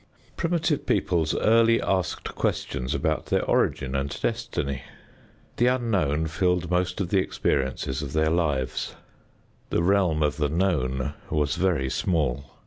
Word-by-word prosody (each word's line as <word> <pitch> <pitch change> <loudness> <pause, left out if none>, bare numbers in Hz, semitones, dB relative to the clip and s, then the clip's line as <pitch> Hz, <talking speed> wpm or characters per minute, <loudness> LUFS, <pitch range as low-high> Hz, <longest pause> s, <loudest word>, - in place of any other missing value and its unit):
Primitive 165 -3 0
peoples 80 -3 +1
early 115 +1 +4
asked 95 -4 -1
questions 60 +1 -2
about 80 0 -1
their - - +1
origin 65 -2 +1
and 70 +1 -2
destiny. 70 -2 -2 0.8
The 120 - +3
unknown 100 - +1
filled 90 +1 0
most 90 +1 0
of 95 -3 -1
the 100 - +3
experiences 65 -5 -1
of 70 -3 -6
their 80 0 +2
lives. 75 -7 -1 0.7
The - - +1
realm 90 -5 +3
of 75 -1 0
the 75 -2 +1
known 70 -6 0 0.2
was 75 -1 0
very 85 -8 +1
small. 70 -6 -1
80 Hz, 135 wpm, -25 LUFS, 70-95 Hz, 0.8 s, early